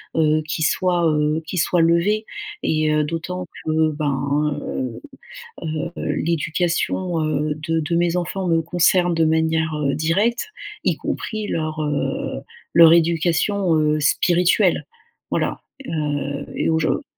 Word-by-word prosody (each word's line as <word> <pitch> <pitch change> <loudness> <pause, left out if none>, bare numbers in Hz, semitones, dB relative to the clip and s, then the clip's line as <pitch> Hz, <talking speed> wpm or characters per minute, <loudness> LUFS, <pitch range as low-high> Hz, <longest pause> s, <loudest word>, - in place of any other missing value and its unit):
heu, 155 -1 +3
qui 160 -1 -2
soit, 175 +2 +1
heu, 150 +1 +1
qui 185 - -5
soit 175 0 +2
levé, 170 +6 +2 0.4
et 155 -1 +1
heu, 150 0 +2
d'autant 170 +4 -4 0.2
que, 155 0 +2
ben, 145 0 -1
heu 130 -4 -4 0.8
heu 170 - -3 0.2
l'éducation, 170 +2 -1
heu, 150 0 -1
de 160 +2 -2
de 170 +2 -1
mes 175 0 +1
enfants 180 +1 -2
me 165 -1 +2
concerne 175 +1 +2
de 165 0 +3
manière, 160 0 +1
heu, 140 -2 0
directe 200 - 0 0.3
y - - +2
compris 215 -1 -4
leur 155 -1 -2
heu 150 -1 -2 0.3
leur 165 -1 +9
éducation, 170 +2 +2
heu, 150 0 +2
spirituelle. 175 +4 +2 0.5
Voilà - - -1 0.3
heu, 145 -3 -2
et - - 0
aujou 160 - +1
160 Hz, 135 wpm, -21 LUFS, 155-175 Hz, 0.8 s, leur